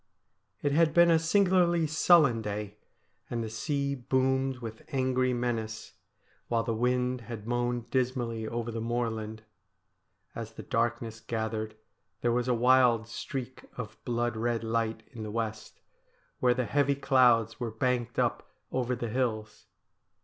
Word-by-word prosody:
It 145 Hz, -, +2 dB
had 155 Hz, +1 st, +3 dB
been 170 Hz, 0 st, +7 dB
a 165 Hz, -, +5 dB
singularly 175 Hz, -1 st, +3 dB
sullen 155 Hz, -6 st, +4 dB
day, 105 Hz, -1 st, -5 dB, 0.5 s
and 115 Hz, -1 st, -2 dB
the 110 Hz, -, -5 dB
sea 140 Hz, +5 st, -1 dB
boomed 130 Hz, 0 st, 0 dB
with 115 Hz, -3 st, -8 dB
angry 130 Hz, -1 st, +1 dB
menace, 120 Hz, -3 st, -3 dB, 0.5 s
while 115 Hz, -1 st, +1 dB
the 115 Hz, 0 st, -1 dB
wind 125 Hz, +2 st, 0 dB
had 115 Hz, -2 st, -8 dB
moaned 120 Hz, 0 st, -1 dB
dismally 120 Hz, -4 st, -1 dB
over 115 Hz, +1 st, -3 dB
the 115 Hz, 0 st, -4 dB
moorland. 110 Hz, -2 st, -3 dB, 0.9 s
As -, -, -6 dB
the -, -, -9 dB
darkness 115 Hz, -1 st, -1 dB
gathered, 110 Hz, -1 st, -3 dB, 0.5 s
there 120 Hz, -, +2 dB
was 120 Hz, +1 st, 0 dB
a 125 Hz, -, +2 dB
wild 120 Hz, -2 st, +4 dB
streak 130 Hz, +2 st, -6 dB
of 115 Hz, -4 st, -7 dB
blood 120 Hz, -1 st, -1 dB
red 115 Hz, +1 st, -1 dB
light 115 Hz, 0 st, -1 dB
in 120 Hz, -4 st, -9 dB
the 110 Hz, -, -4 dB
west, 110 Hz, -1 st, -4 dB, 0.6 s
where 125 Hz, -1 st, +3 dB
the 125 Hz, 0 st, 0 dB
heavy 140 Hz, +2 st, +2 dB
clouds 120 Hz, -5 st, +3 dB
were 120 Hz, -2 st, -2 dB
banked 120 Hz, +1 st, -1 dB
up -, -, 0 dB, 0.2 s
over 125 Hz, -1 st, 0 dB
the 120 Hz, -1 st, -4 dB
hills. 110 Hz, -3 st, -2 dB
120 Hz, 145 wpm, -29 LUFS, 115-130 Hz, 0.9 s, been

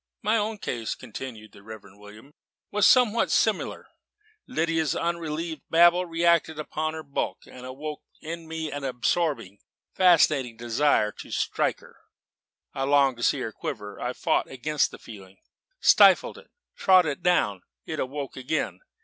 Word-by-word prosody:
My 215 Hz, +2 st, +2 dB
own 215 Hz, 0 st, -1 dB
case," 120 Hz, -, -4 dB
continued 115 Hz, -2 st, -9 dB
the -, -, -16 dB
Reverend 105 Hz, -1 st, -12 dB
William, 105 Hz, +6 st, -14 dB, 0.4 s
"was 210 Hz, -1 st, +4 dB
somewhat 235 Hz, -3 st, +4 dB
similar. -, -, 0 dB, 0.6 s
Lydia's 165 Hz, -, 0 dB
unrelieved 165 Hz, -1 st, -3 dB
babble 175 Hz, +2 st, +5 dB
reacted 165 Hz, -1 st, +2 dB
upon 155 Hz, +1 st, -3 dB
her 160 Hz, -, -7 dB
bulk, 140 Hz, -1 st, -4 dB
and 125 Hz, 0 st, -11 dB
awoke 150 Hz, +3 st, -7 dB, 0.2 s
in 165 Hz, +1 st, -7 dB
me 160 Hz, -1 st, -4 dB
an 145 Hz, -1 st, -5 dB
absorbing, 125 Hz, -, -1 dB, 0.3 s
fascinating 150 Hz, -9 st, +3 dB
desire 120 Hz, -2 st, +1 dB
to -, -, -9 dB
strike -, -, -1 dB
her. -, -, -18 dB, 0.8 s
I 135 Hz, -, -5 dB
longed 135 Hz, -2 st, +3 dB
to 120 Hz, -, -6 dB
see 140 Hz, -, +2 dB
her 110 Hz, -, -4 dB
quiver. 105 Hz, -1 st, -7 dB
I 125 Hz, +1 st, -2 dB
fought -, -, 0 dB
against 150 Hz, +3 st, 0 dB
the -, -, -11 dB
feeling, 95 Hz, -4 st, -13 dB, 0.4 s
stifled -, -, +5 dB
it, -, -, -19 dB, 0.3 s
trod 185 Hz, -2 st, +5 dB
it 145 Hz, -3 st, -3 dB
down: 105 Hz, -, +1 dB, 0.2 s
it -, -, -5 dB
awoke 140 Hz, +1 st, -4 dB
again. 130 Hz, +4 st, -3 dB
145 Hz, 150 wpm, -26 LUFS, 120-165 Hz, 0.8 s, babble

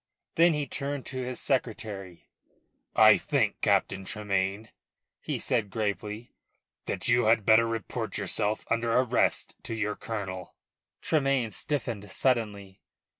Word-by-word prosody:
Then 170 Hz, -1 st, +5 dB
he 150 Hz, -1 st, -1 dB
turned 140 Hz, +1 st, -3 dB
to 130 Hz, -, -5 dB
his 125 Hz, 0 st, -3 dB
secretary. 110 Hz, -, -3 dB, 0.7 s
"I -, -, +8 dB
think, -, -, 0 dB
Captain 95 Hz, 0 st, +1 dB
Tremayne," 100 Hz, +1 st, -2 dB, 0.5 s
he -, -, -3 dB
said 105 Hz, -3 st, 0 dB
gravely, 105 Hz, +1 st, -3 dB, 0.6 s
"that -, -, -3 dB
you 120 Hz, 0 st, +4 dB
had 110 Hz, -1 st, +3 dB
better 115 Hz, +1 st, +6 dB
report 115 Hz, -2 st, -3 dB
yourself 105 Hz, +2 st, -1 dB
under 115 Hz, 0 st, +1 dB
arrest 125 Hz, 0 st, +2 dB
to 115 Hz, -, -5 dB
your 105 Hz, -1 st, -1 dB
colonel." 95 Hz, -5 st, -6 dB, 0.5 s
Tremayne 135 Hz, -7 st, +1 dB
stiffened 115 Hz, -9 st, -3 dB
suddenly. 105 Hz, -7 st, 0 dB
110 Hz, 125 wpm, -28 LUFS, 100-125 Hz, 0.7 s, I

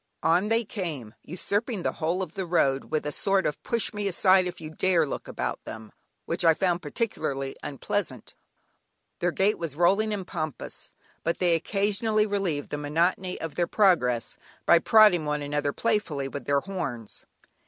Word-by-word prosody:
On 175 Hz, +5 st, +3 dB
they 225 Hz, +1 st, +1 dB
came, 155 Hz, -, -5 dB
usurping 205 Hz, +4 st, -2 dB
the -, -, +1 dB
whole 170 Hz, +4 st, -1 dB
of 170 Hz, -3 st, -8 dB
the 190 Hz, -2 st, -4 dB
road, 140 Hz, -6 st, +2 dB
with 155 Hz, -1 st, 0 dB
a 150 Hz, -, -1 dB
sort 195 Hz, +4 st, +1 dB
of 150 Hz, -, -2 dB
"push 230 Hz, -3 st, -1 dB
me 205 Hz, -1 st, -2 dB
aside 185 Hz, 0 st, +4 dB
if 180 Hz, 0 st, -6 dB
you 155 Hz, -1 st, -7 dB
dare" 170 Hz, 0 st, +2 dB
look 140 Hz, -, -5 dB
about -, -, -4 dB
them, 110 Hz, -1 st, -9 dB, 0.3 s
which -, -, -2 dB
I 165 Hz, -1 st, +6 dB
found 175 Hz, -1 st, +1 dB
particularly 145 Hz, -, -3 dB
unpleasant. 140 Hz, -, -3 dB, 0.9 s
Their 175 Hz, -, +1 dB
gait 195 Hz, +5 st, +1 dB
was 165 Hz, -5 st, -4 dB
rolling 200 Hz, +6 st, +3 dB
and 200 Hz, -3 st, -3 dB
pompous, 155 Hz, -6 st, -5 dB, 0.3 s
but 170 Hz, -, 0 dB
they 175 Hz, -2 st, +3 dB
occasionally 210 Hz, +5 st, +1 dB
relieved 195 Hz, -8 st, -2 dB
the 145 Hz, -, -2 dB
monotony 170 Hz, +5 st, 0 dB
of 165 Hz, -3 st, -5 dB
their 175 Hz, +3 st, 0 dB
progress 145 Hz, -, +2 dB, 0.3 s
by 170 Hz, -, +6 dB
prodding 210 Hz, -3 st, +6 dB
one 150 Hz, 0 st, -1 dB
another 145 Hz, 0 st, -1 dB
playfully 175 Hz, -10 st, -1 dB
with 140 Hz, +1 st, -7 dB
their 140 Hz, 0 st, +2 dB
horns. 130 Hz, -, -6 dB
175 Hz, 170 wpm, -27 LUFS, 150-195 Hz, 0.9 s, I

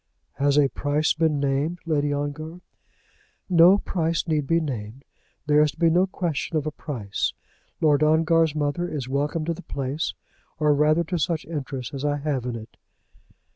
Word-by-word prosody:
"Has 140 Hz, 0 st, +2 dB
a 145 Hz, -2 st, +5 dB
price 145 Hz, +3 st, 0 dB
been 155 Hz, -2 st, +1 dB
named, 140 Hz, +5 st, 0 dB
Lady 145 Hz, -3 st, +1 dB
Ongar?" 150 Hz, +4 st, -4 dB, 0.9 s
"No 180 Hz, +1 st, +7 dB
price 170 Hz, -4 st, -1 dB
need 150 Hz, -3 st, 0 dB
be 165 Hz, 0 st, +3 dB
named. 130 Hz, -4 st, -5 dB, 0.4 s
There 150 Hz, 0 st, +4 dB
is 150 Hz, -1 st, +2 dB
to -, -, -26 dB
be 165 Hz, -1 st, +3 dB
no 180 Hz, +3 st, +3 dB
question 170 Hz, -3 st, -2 dB
of 150 Hz, -, -1 dB
a 155 Hz, -, -2 dB
price. 120 Hz, -11 st, -3 dB, 0.5 s
Lord 150 Hz, -2 st, +4 dB
Ongar's 160 Hz, 0 st, +3 dB
mother 150 Hz, +4 st, -1 dB
is 140 Hz, -5 st, -4 dB
welcome 145 Hz, +4 st, -1 dB
to 170 Hz, -, 0 dB
the 165 Hz, -, -9 dB
place, 140 Hz, 0 st, -3 dB, 0.4 s
or 150 Hz, -2 st, +3 dB
rather 155 Hz, +3 st, +3 dB
to 175 Hz, +1 st, -3 dB
such 160 Hz, -1 st, -1 dB
interest 135 Hz, -4 st, -5 dB
as 135 Hz, 0 st, -5 dB
I 145 Hz, 0 st, +1 dB
have 140 Hz, -4 st, -2 dB
in 120 Hz, -, -3 dB
it." 110 Hz, -1 st, -10 dB
150 Hz, 175 wpm, -24 LUFS, 140-165 Hz, 0.9 s, No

